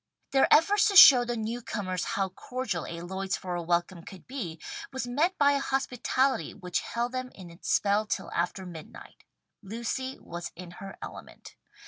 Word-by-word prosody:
Their 270 Hz, -1 st, +3 dB
effort 395 Hz, +7 st, +5 dB
to 400 Hz, -, 0 dB
show 265 Hz, -8 st, +11 dB
the 240 Hz, 0 st, -2 dB
newcomers 215 Hz, -5 st, -3 dB
how 195 Hz, -1 st, 0 dB
cordial 190 Hz, -, -4 dB
a 170 Hz, 0 st, -6 dB
Lloydsboro 190 Hz, -1 st, -3 dB
welcome 175 Hz, +1 st, 0 dB
could 185 Hz, +1 st, -12 dB
be, 215 Hz, -, -6 dB, 0.3 s
was 265 Hz, -1 st, -3 dB
met 300 Hz, +10 st, 0 dB
by 285 Hz, -1 st, +5 dB
a 280 Hz, -, +1 dB
hospitality 265 Hz, -, 0 dB
which 180 Hz, -1 st, -2 dB
held 235 Hz, +1 st, -3 dB
them 255 Hz, 0 st, -4 dB
in 180 Hz, -3 st, -11 dB
its 170 Hz, -, -9 dB
spell 205 Hz, +1 st, +2 dB
till -, -, -3 dB
after 180 Hz, +2 st, -2 dB
midnight. 165 Hz, -3 st, -11 dB, 0.4 s
Lucy 235 Hz, +5 st, -4 dB
was 170 Hz, 0 st, -7 dB
in 180 Hz, 0 st, -10 dB
her 195 Hz, 0 st, -8 dB
element. -, -, -10 dB
210 Hz, 160 wpm, -28 LUFS, 180-260 Hz, 0.4 s, show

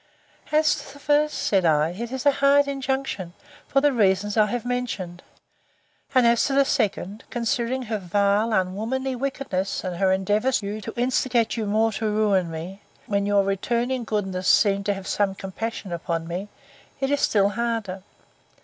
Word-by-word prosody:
As 305 Hz, 0 st, +4 dB
to 275 Hz, -, -8 dB
the 285 Hz, -, -14 dB
first, 295 Hz, +1 st, +2 dB
sir, 200 Hz, -, +1 dB
said -, -, -4 dB
I, 155 Hz, 0 st, +3 dB
it 235 Hz, +6 st, -6 dB
is 265 Hz, 0 st, -4 dB
a 285 Hz, -, +7 dB
hard 280 Hz, +1 st, +4 dB
injunction, 265 Hz, -9 st, -3 dB, 0.3 s
for 275 Hz, -, +2 dB
the 290 Hz, -1 st, +3 dB
reasons 205 Hz, -2 st, +2 dB
I 215 Hz, -1 st, +4 dB
have 240 Hz, +2 st, -3 dB
mentioned. 215 Hz, -8 st, -3 dB, 0.9 s
And 255 Hz, -2 st, +5 dB
as 235 Hz, 0 st, +4 dB
to 275 Hz, -, -1 dB
the 275 Hz, 0 st, +4 dB
second, 210 Hz, -4 st, -1 dB
considering 245 Hz, +1 st, -1 dB
her 220 Hz, -2 st, -3 dB
vile, 200 Hz, +4 st, +1 dB
unwomanly 220 Hz, +7 st, -1 dB
wickedness, 255 Hz, -7 st, -2 dB
and 180 Hz, -2 st, -4 dB
her 190 Hz, +1 st, +2 dB
endeavours 210 Hz, +7 st, +1 dB
to 205 Hz, 0 st, -5 dB
instigate 245 Hz, -1 st, +1 dB
you 220 Hz, -3 st, -2 dB
more 220 Hz, +2 st, +2 dB
to 215 Hz, +1 st, -2 dB
ruin 205 Hz, -4 st, +2 dB
me, 170 Hz, +5 st, -7 dB, 0.2 s
when 200 Hz, -1 st, 0 dB
your 205 Hz, -1 st, +3 dB
returning 235 Hz, +6 st, -1 dB
goodness 190 Hz, -4 st, -2 dB
seemed 205 Hz, -1 st, +3 dB
to 205 Hz, -, +1 dB
have 195 Hz, -1 st, -8 dB
some 200 Hz, -2 st, 0 dB
compassion 195 Hz, +1 st, -5 dB
upon 165 Hz, -1 st, -3 dB
me, 180 Hz, +4 st, -4 dB, 0.5 s
it 270 Hz, 0 st, -1 dB
is 285 Hz, -, +1 dB
still 200 Hz, -2 st, +3 dB
harder. 220 Hz, -3 st, -2 dB
215 Hz, 170 wpm, -24 LUFS, 195-250 Hz, 0.9 s, a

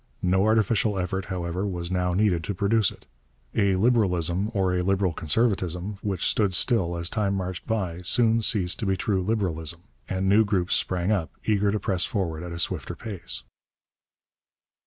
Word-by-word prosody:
No 95 Hz, +2 st, +3 dB
artificial 110 Hz, -1 st, +2 dB
effort, 95 Hz, +1 st, -2 dB
however, 90 Hz, -1 st, -3 dB
was 90 Hz, -2 st, -4 dB
now 90 Hz, -1 st, 0 dB
needed 95 Hz, -5 st, +2 dB
to 100 Hz, -, -3 dB
produce 105 Hz, +2 st, +3 dB
it. -, -, -14 dB, 0.5 s
A 100 Hz, -3 st, +2 dB
Liberalism 95 Hz, -4 st, +2 dB
or 95 Hz, -4 st, +1 dB
a 90 Hz, -, +1 dB
Liberal 95 Hz, -1 st, +1 dB
Conservatism 95 Hz, +1 st, 0 dB
which 95 Hz, -4 st, -2 dB
stood 100 Hz, -4 st, +1 dB
still 90 Hz, -4 st, +1 dB
as 85 Hz, 0 st, -1 dB
time 100 Hz, -1 st, 0 dB
marched 95 Hz, -2 st, -4 dB
by 95 Hz, -7 st, -2 dB
soon 115 Hz, +4 st, +3 dB
ceased 95 Hz, -5 st, 0 dB
to 110 Hz, -, -2 dB
be 95 Hz, 0 st, +1 dB
true 95 Hz, -2 st, 0 dB
Liberalism; 85 Hz, -5 st, -2 dB, 0.3 s
and 95 Hz, 0 st, -1 dB
new 105 Hz, +3 st, +5 dB
groups 95 Hz, -4 st, +1 dB
sprang 90 Hz, +2 st, 0 dB
up, 95 Hz, -7 st, 0 dB, 0.2 s
eager 105 Hz, -1 st, +2 dB
to 105 Hz, -, -1 dB
press 95 Hz, -1 st, 0 dB
forward 85 Hz, -7 st, -2 dB
at 90 Hz, 0 st, -6 dB
a 85 Hz, -, -5 dB
swifter 85 Hz, -, -2 dB
pace. 105 Hz, -7 st, -6 dB
95 Hz, 170 wpm, -26 LUFS, 90-105 Hz, 0.5 s, new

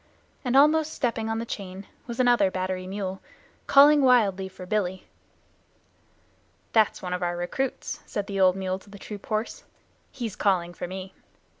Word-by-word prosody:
And 250 Hz, 0 st, +2 dB
almost 310 Hz, +2 st, +4 dB
stepping 230 Hz, -3 st, -1 dB
on 225 Hz, -, -1 dB
the 230 Hz, -, -3 dB
chain 195 Hz, -3 st, -7 dB, 0.2 s
was 235 Hz, 0 st, -6 dB
another 240 Hz, -6 st, +4 dB
battery 185 Hz, 0 st, -3 dB
mule, 190 Hz, -1 st, -4 dB, 0.5 s
calling 290 Hz, +1 st, +7 dB
wildly 205 Hz, -8 st, +3 dB
for 185 Hz, 0 st, -10 dB
"Billy." 190 Hz, -2 st, -2 dB, 1.7 s
"That's 220 Hz, -3 st, +3 dB
one 180 Hz, -1 st, -3 dB
of 180 Hz, -, -3 dB
our 175 Hz, 0 st, -1 dB
recruits," 250 Hz, +10 st, -3 dB
said 205 Hz, -, -3 dB
the 200 Hz, -1 st, -4 dB
old 185 Hz, -1 st, +5 dB
mule 190 Hz, -1 st, -2 dB
to 200 Hz, -, -19 dB
the 200 Hz, -, -11 dB
troop 205 Hz, 0 st, -9 dB
horse. 215 Hz, +1 st, -3 dB, 0.5 s
"He's 235 Hz, -6 st, -5 dB
calling 175 Hz, -3 st, +1 dB
for 175 Hz, -, -6 dB
me. 190 Hz, +1 st, -7 dB
200 Hz, 160 wpm, -26 LUFS, 185-235 Hz, 1.7 s, calling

